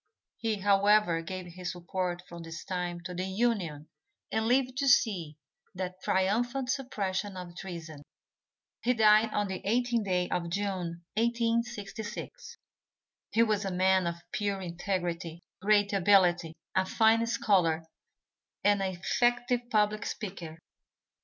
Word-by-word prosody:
He, 225 -2 0
however, 200 -3 +3
gave 185 +2 -6
his 175 0 -6
support 175 0 -3
from 170 0 -9
this 165 0 -8
time 175 -2 -3
to 180 +1 -6
the 180 +1 -2
Union 190 -8 -1 0.4
and 220 0 0
lived 255 +1 +2
to 280 - +1
see 180 - +3 0.4
that 185 0 -5
triumphant 240 +7 +1
suppression 205 -7 -2
of 175 -1 -8
treason. 165 -5 -7 0.8
He 250 +1 +2
died 215 0 +5
on 205 -1 0
the 190 -1 -4
18th 235 +1 +1
day 180 -2 +1
of 170 -1 -1
June, 180 -3 -3
1866. 235 - -2 0.7
He 230 - +4
was 215 -2 +1
a 195 - -2
man 185 0 +3
of 170 - -2 0.2
pure 200 -2 -1
integrity, 175 -2 -3 0.2
great 205 0 +3
ability, 180 -4 +4 0.2
a 190 0 +2
fine 225 +2 +3
scholar 175 -8 +2 0.8
and 205 -1 +4
an 190 -1 -1
effective 240 +5 +1
public 210 -1 +1
speaker. 175 -6 -6
195 Hz, 130 wpm, -30 LUFS, 175-220 Hz, 0.8 s, died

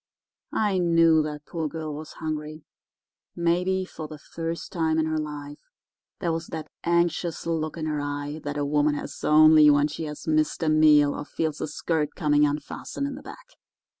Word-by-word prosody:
I 205 -3 +1
knew 165 -2 +4
that 150 -1 -5
poor 165 -2 -3
girl 155 0 -5
was 150 +1 -8
hungry—maybe 170 +4 -4
for 155 -4 -8
the 155 - -9
first 165 +3 -6
time 160 -2 0
in 160 - +2
her 155 0 -1
life. 145 -1 -6 0.6
There 170 - -1
was 165 +1 -3
that 155 -2 -7
anxious 170 0 0
look 160 -1 -2
in 160 - -3
her 150 -2 -1
eye 145 +1 -4
that 145 0 -4
a 145 - 0
woman 145 +1 +2
has - - -7
only 155 0 +7
when 145 0 +4
she 155 +2 -5
has 150 -1 -7
missed 155 0 +1
a 160 - +2
meal 150 -2 +5
or - - -5
feels 155 +1 -3
her - - -2
skirt 150 0 -2
coming 150 -2 +3
unfastened 145 - -4
in 280 - -3
the 275 - -9
back. - - -11
155 Hz, 180 wpm, -25 LUFS, 150-165 Hz, 0.6 s, only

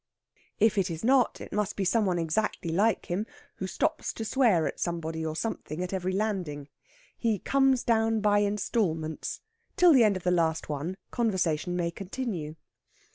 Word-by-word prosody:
If 215 -1 +3
it 190 -1 +1
is 165 -1 -5
not, 255 +1 +3
it - - -9
must 210 -1 -1
be 195 - -1
some 215 +2 +2
one 180 -2 +1
exactly 170 +1 -1
like 210 +7 +2
him, 200 +4 -2 0.3
who 190 - -3
stops - - -1
to 225 - -5
swear 215 -8 +3
at - - -4
somebody 165 -2 -3
or 155 -1 -3
something 175 -4 -3
at 180 - -5
every 185 -1 -1
landing. 185 -8 -2 0.5
He 225 -3 +1
comes 270 +4 +2
down 225 -1 +2
by 205 -1 +3
instalments. 195 -6 -1 0.4
Till 355 -4 +7
the 255 -4 +6
end 205 -3 +3
of 185 - -10
the 180 - +2
last 165 -2 +1
one, 155 +6 -3
conversation 180 -7 0
may 170 -1 -1
continue. 185 -5 -5
190 Hz, 175 wpm, -28 LUFS, 165-220 Hz, 0.5 s, Till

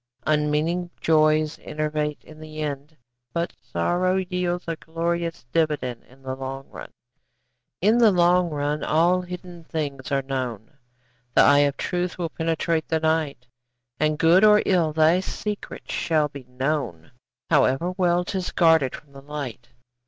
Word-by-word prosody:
Unmeaning 155 +4 +1
joys 155 -1 +3
enervate 150 0 -3
in 155 0 -14
the 155 0 -9
end, 150 +1 -5 0.4
But 170 0 -2
sorrow 175 - 0
yields 180 -1 -1
a 165 - -1
glorious 170 -1 -3
dividend 150 -7 0
In 135 +2 -21
the 130 0 -4
long 135 +1 -6
run. - - -9 0.9
In 215 +6 +4
the 230 -2 +7
long 180 -1 +3
run 150 0 -2
all 175 +4 +3
hidden 180 -1 -9
things 145 -4 -4
are 135 -1 +1
known, 130 -2 -4 0.6
The - - +7
eye 145 0 +6
of 140 - -9
truth 180 0 -2
will 170 -2 -2
penetrate 165 0 -1
the 160 - +1
night, 160 -5 0 0.5
And 155 0 +1
good 165 +5 +5
or 210 0 +6
ill, 175 -5 +2
thy 160 +3 +4
secret 205 +2 -5
shall 155 -3 +1
be 140 -2 -10
known, 125 - -3 0.4
However 140 +4 +3
well 180 -1 +2
'tis 185 0 -3
guarded 160 -6 +3
from 140 -1 -15
the 135 - -11
light. 140 -5 -6
155 Hz, 145 wpm, -24 LUFS, 145-175 Hz, 0.9 s, the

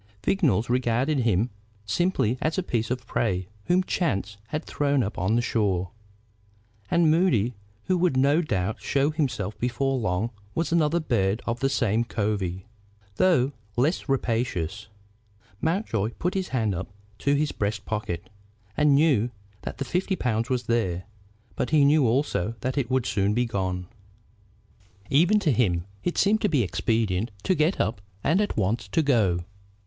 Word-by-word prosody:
Vignolles 135 - +2
regarded 125 +4 +1
him 115 -1 +1 0.3
simply 125 - +1
as 155 +3 0
a 190 - +1
piece 115 -9 -1
of 125 -1 -3
prey 95 -6 -1 0.2
whom 180 +1 +3
chance 105 - -1
had 150 +7 -4
thrown 140 -2 +1
up 105 - -4
on 95 +6 +1
the 120 - +2
shore. 95 -6 0 1.0
And 170 -2 +4
Moody, 130 - +2 0.3
who 185 -1 +1
would 170 -7 +2
no 140 +5 +4
doubt 105 - -2
show 140 +2 +1
himself 120 -10 -2
before 130 +2 0
long, 105 +2 -1 0.2
was 165 -1 -1
another 165 0 +3
bird 110 - 0
of 120 0 -2
the 135 - +1
same 115 -4 +1
covey, 100 -5 -2 0.5
though 145 -8 +3 0.2
less 145 +5 0
rapacious. 110 -7 -1 0.7
Mountjoy 140 - 0
put 180 +2 -1
his 190 -2 -1
hand 110 -6 0
up 90 +1 -4 0.3
to 140 0 +2
his 150 +1 +1
breast 105 0 -2
pocket, 105 -3 -3 0.5
and 150 -1 +4
knew 140 -6 +3 0.3
that - - -6
the 140 - -3
fifty 185 +7 0
pounds 115 -5 -1
was 125 -1 0
there, 110 -7 0 0.5
but - - -1
he 150 -2 +5
knew 145 -2 +4
also 115 -4 0
that 130 0 -2
it 135 -4 -1
would 130 -2 +1
soon 100 +1 +1
be 125 +1 +2
gone. 95 -4 -2 1.3
Even 175 +9 +5
to 165 -7 +2
him 90 -9 +1 0.2
it 175 - -1
seemed 210 +2 +3
to 210 - +2
be 140 -7 +2
expedient 105 +3 0
to - - +2
get 160 +2 +1
up 105 -2 -1 0.2
and 175 +7 +3
at 205 - -2
once 105 +1 0
to 160 +11 +1
go. 100 - +2
120 Hz, 160 wpm, -26 LUFS, 105-150 Hz, 1.3 s, he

